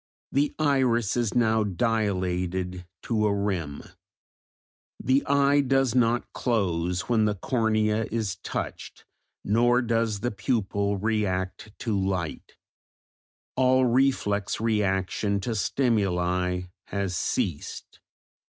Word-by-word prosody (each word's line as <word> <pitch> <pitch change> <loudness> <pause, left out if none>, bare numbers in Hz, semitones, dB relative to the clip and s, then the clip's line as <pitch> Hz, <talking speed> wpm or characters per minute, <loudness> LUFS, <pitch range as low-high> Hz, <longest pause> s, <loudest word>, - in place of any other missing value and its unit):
The 140 +2 +1
iris 130 -7 +2
is 120 -3 0
now 110 -2 +3
dilated 90 -4 -1 0.2
to 110 -2 +1
a - - +2
rim; 90 -8 -2 1.2
the 130 +2 +2
eye 140 0 +4
does 135 -2 +2
not 120 -1 +1
close 90 -6 0
when 110 -1 +1
the 105 -1 +1
cornea 110 0 +1
is 110 -4 -2
touched, - - -6 0.4
nor 120 +4 +3
does 115 -3 0
the 120 - -1
pupil 100 -1 -1
react 100 -1 -2
to 115 -4 -1
light; 95 -4 -2 1.0
all 130 0 +4
reflex 120 -5 +1
reaction 100 -2 0
to 115 +4 -2
stimuli 90 -6 0 0.3
has 100 -3 -2
ceased. 85 -2 -3
105 Hz, 105 wpm, -26 LUFS, 95-120 Hz, 1.2 s, eye